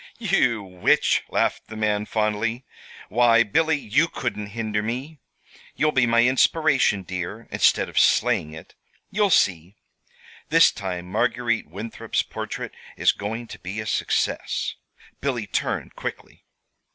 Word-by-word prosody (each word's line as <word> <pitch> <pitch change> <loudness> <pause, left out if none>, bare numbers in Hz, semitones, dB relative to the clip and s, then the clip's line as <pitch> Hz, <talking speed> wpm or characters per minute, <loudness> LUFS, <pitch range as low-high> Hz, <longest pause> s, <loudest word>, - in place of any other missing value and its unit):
"You 130 - +1
witch!" 90 -2 +2
laughed - - 0
the 110 - -9
man, 105 -1 0
fondly. 110 +3 -1 0.4
"Why, 115 0 +5
Billy, 160 +8 +2
you 145 +5 +1
couldn't 120 -9 -4
hinder 110 -2 -1
me. 130 +8 -5 0.6
You'll 155 0 +2
be 125 -4 +3
my 115 0 +4
inspiration, 130 - +3
dear, 90 +5 -6
instead - - +3
of - - 0
slaying 75 - +3
it. 80 - -12 0.4
You'll 205 0 +2
see. 90 - +2 0.7
This - - +6
time 90 -3 -5
Marguerite 115 +2 -1
Winthrop's 105 +7 -3
portrait - - -6 0.2
is - - +4
going 110 +4 -5
to - - -9
be 95 +5 -6
a 110 - -4
success." - - -1 0.5
Billy 125 -6 -2
turned 95 - -3
quickly. - - -7
115 Hz, 130 wpm, -24 LUFS, 100-130 Hz, 0.7 s, This